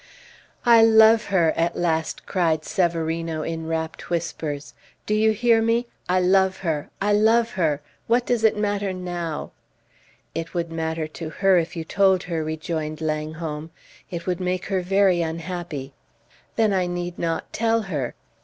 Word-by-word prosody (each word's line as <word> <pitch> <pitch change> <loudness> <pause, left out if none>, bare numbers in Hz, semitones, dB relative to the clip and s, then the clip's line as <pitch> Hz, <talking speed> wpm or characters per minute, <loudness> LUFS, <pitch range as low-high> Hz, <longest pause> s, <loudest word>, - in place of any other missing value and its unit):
"I 235 -1 +7
love 220 0 +6
her!" 170 -5 +3
at 170 +1 0
last 160 -2 -1
cried 165 -4 0
Severino, 165 -3 -1
in 160 0 -4
rapt 160 0 -4
whispers. 155 -4 -3 0.3
"Do 210 - 0
you 215 +1 +4
hear 230 +1 +3
me? 230 +2 +2 0.2
I 185 +1 +3
love 190 +1 +3
her! 155 -3 -1
I 205 +1 +2
love 225 +2 +4
her! 155 -6 0 0.3
What 240 +1 +2
does 240 -2 0
it 220 -1 +4
matter 205 -2 -1
now?" 175 -4 -4 0.8
"It 165 +1 -5
would 170 -1 -2
matter 160 -1 -2
to 155 +1 -7
her 190 +3 +3
if 165 +1 -4
you 165 - -3
told 190 +2 +3
her," 165 -3 -2
rejoined 155 0 -3
Langholm. 155 0 -3 0.4
"It 170 -1 -5
would 180 -1 -1
make 180 0 -2
her 190 - +2
very 190 -1 +3
unhappy." 165 -4 -4 0.6
"Then 220 -3 +3
I 185 -2 +1
need 175 0 -4
not 165 -1 -2
tell 230 0 +1
her." 150 - -3
175 Hz, 155 wpm, -23 LUFS, 160-200 Hz, 0.8 s, I